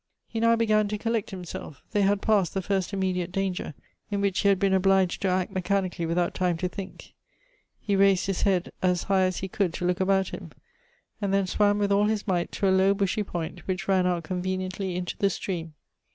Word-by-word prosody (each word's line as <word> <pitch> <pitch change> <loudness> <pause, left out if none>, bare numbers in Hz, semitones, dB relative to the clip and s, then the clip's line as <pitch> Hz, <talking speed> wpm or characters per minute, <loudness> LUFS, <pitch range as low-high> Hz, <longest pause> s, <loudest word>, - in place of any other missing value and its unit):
He 225 - -5
now 230 0 +4
began 215 -2 +2
to 210 +1 -3
collect 225 0 -1
himself; 180 -5 -8
they 205 - +1
had 200 0 +2
past 205 -6 +2
the 195 - 0
first 195 -1 -1
immediate 185 -2 -1
danger, 190 -5 -2 0.3
in 200 -1 -1
which 200 -2 0
he 200 - +2
had 195 - +4
been 195 0 +2
obliged 190 -1 +3
to 195 - +1
act 185 +1 0
mechanically 185 -2 -1
without 175 +1 0
time 180 -2 0
to 180 - -1
think; 190 +1 -9 0.7
he 205 - -1
raised 195 -1 +4
his 195 -2 -1
head 185 -3 +1
as 180 -2 +1
high 190 -1 +2
as 185 -1 -2
he 190 - -3
could 190 -3 -1
to 180 - -3
look 180 +1 +1
about 190 0 +2
him; - - -8 0.7
and 200 -1 0
then 195 0 +2
swam 205 +2 +2
with 205 -1 0
all 200 +1 +4
his 215 0 -1
might 175 -3 0
to 200 - 0
a 190 - +4
low 190 +1 +4
bushy 200 +1 0
point, 175 -3 -4
which 185 -1 -2
ran 190 -2 +3
out 175 -2 0
conveniently 185 +1 -3
into 180 0 -3
the 200 - +3
stream. 170 -4 -4
190 Hz, 215 wpm, -26 LUFS, 180-200 Hz, 0.7 s, now